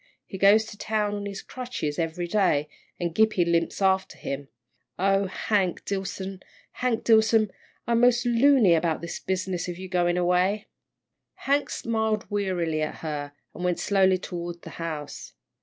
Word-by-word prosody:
He 190 - -8
goes 205 +3 +6
to 210 -2 -11
town 210 -1 0
on 205 0 -4
his 200 -1 -6
crutches 245 - -4
every 165 +1 -2
day, 170 -6 +2 0.3
an' 170 -2 -2
Gippie 220 -3 +3
limps 170 +3 0
after 190 0 +1
him 140 0 -5 0.5
oh, 195 +1 +2
Hank 190 -1 -1
Dillson, 190 -1 -4 0.3
Hank 250 -3 -1
Dillson, 220 -2 +4 0.3
I'm 235 0 +2
mos' 245 0 +4
loony 240 -4 +5
about 165 -1 +1
this 170 - -5
business 185 -1 -2
of 175 -1 -5
your 185 0 -8
goin' 175 -1 +1
away." 180 +4 +2 0.8
Hank 285 +1 +2
smiled 220 -2 -1
wearily 180 -6 -1
at 155 - -2
her, 145 -2 -4 0.2
and 180 - -7
went 180 -1 +1
slowly 190 -2 +3
toward 175 -2 -6
the - - -9
house. 155 -3 -6
190 Hz, 155 wpm, -26 LUFS, 175-215 Hz, 0.8 s, goes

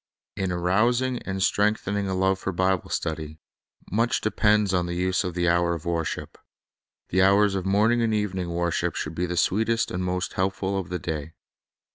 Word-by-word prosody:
In 95 -2 -2
arousing 120 +9 +1
and 95 0 -1
strengthening 100 -1 +1
a 95 - -1
love 95 +1 +1
for 95 - -3
Bible 95 0 0
stud} 80 -1 -2
r, 80 - -5 0.6
much 115 +5 +1
depends 105 -2 +2
on 90 -1 +1
the 85 - -3
use 90 +1 +1
of 90 -2 -4
the 90 0 +1
hour 85 0 +2
of 80 - -9
wor 85 -1 0
ship. - - -6 0.7
The 95 - +2
hours 100 +1 +4
of 95 -1 -2
morning 110 +5 +3
and 115 -1 +1
evening 95 -4 -1
worship 85 0 -1
should 80 - -4
be 90 +2 -2
the 90 0 -3
sweetest 115 +6 +1
and 90 +1 -2
most 90 0 -2
helpful 95 +1 -1
of 95 -4 -3
the 90 - -2
day. 80 -2 -5
95 Hz, 190 wpm, -25 LUFS, 85-105 Hz, 0.7 s, hours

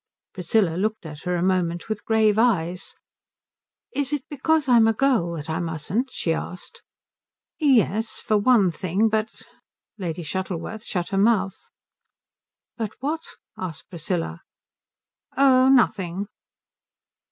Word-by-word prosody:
Priscilla 180 -2 +1
looked 215 0 -2
at 150 +1 -9
her 180 0 0
a 175 - 0
moment 175 -2 0
with 215 -2 -4
grave 220 -1 +3
eyes. 180 -6 +1 1.0
"Is 285 -1 -1
it 295 -3 -1
because 300 +1 +1
I'm 235 -3 +6
a 225 - +3
girl 235 -10 +2
that 150 -2 -6
I 160 +1 -2
mustn't?" 170 - -2
she 165 -9 -1
asked. 180 +2 -6 0.8
"Yes. 225 - +2
For 215 - 0
one 210 -3 +4
thing. 190 +6 0
But 220 0 -2 0.3
" - - -67
Lady 175 -2 -4
Shuttleworth 190 +5 -4
shut 175 -3 -3
her 195 - 0
mouth. 200 -3 +1 1.1
"But 220 -4 -4
what?" 305 +5 -2 0.3
asked 175 -5 -7
Priscilla. 165 - -3 1.0
"Oh, 265 -1 +5
nothing." 200 -7 +2
200 Hz, 130 wpm, -24 LUFS, 175-235 Hz, 1.1 s, I'm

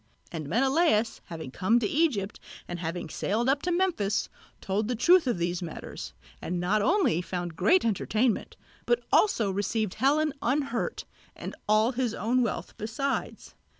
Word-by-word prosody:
And 155 -4 -5
Menelaos 265 - +2
having 160 -5 -7
come 220 - +2
to 240 - +1
Egypt 245 -9 0 0.3
and 175 0 -5
having 170 0 -4
sailed 220 +9 -1
up 275 +1 +2
to 355 - -1
Memphis, 340 - 0 0.3
told 205 +2 -1
the 245 - -1
truth 345 +6 +5
of 240 - +1
these 175 +1 -1
matters, 165 -3 -7 0.3
and 175 +1 -2
not 195 +5 +1
only 335 - +2
found 175 -2 -4
great 235 - +3
entertainment, 225 +2 0 0.3
but 485 - +2
also 230 - +3
received 205 +1 -1
Helen 290 +5 +2
unhurt, 275 - -1 0.3
and - - -7 0.2
all 215 +3 +4
his 245 -3 -1
own 245 +4 +1
wealth 235 - -3
besides. 250 +6 -3
225 Hz, 150 wpm, -28 LUFS, 185-275 Hz, 0.3 s, truth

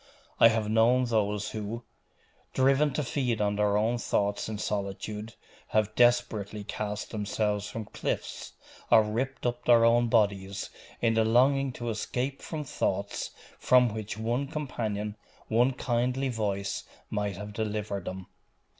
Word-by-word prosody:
I - - +9
have 110 -2 +1
known 115 +4 +4
those 105 -3 0
who, 110 +2 -5 0.7
driven 135 +3 +4
to 150 - -1
feed 125 -4 -1
on 105 -1 +1
their 105 0 +2
own 115 +3 +1
thoughts 100 -1 0
in 110 - -3
solitude, 105 +2 -4 0.3
have 110 0 +1
desperately 115 -4 +2
cast 105 0 -4
themselves 105 -1 -1
from 110 +1 -5
cliffs - - -4 0.4
or 115 -2 +7
ripped 125 +5 -3
up 120 0 -1
their 115 -1 +6
own 120 +1 +4
bodies, 100 -3 +1 0.3
in 115 -1 +3
the 110 0 +3
longing 130 +4 +3
to 120 -1 -4
escape 125 +5 -2
from 155 -2 -4
thoughts, 140 - -2 0.3
from 125 -3 +4
which 110 -1 -5
one 120 +5 -1
companion, 110 -8 -3 0.3
one 120 +4 +4
kindly 125 +1 0
voice, 100 -4 -2 0.3
might 105 -3 -2
have 105 +1 -7
delivered 105 -2 -3
them. 95 0 -5
110 Hz, 140 wpm, -29 LUFS, 105-120 Hz, 0.7 s, I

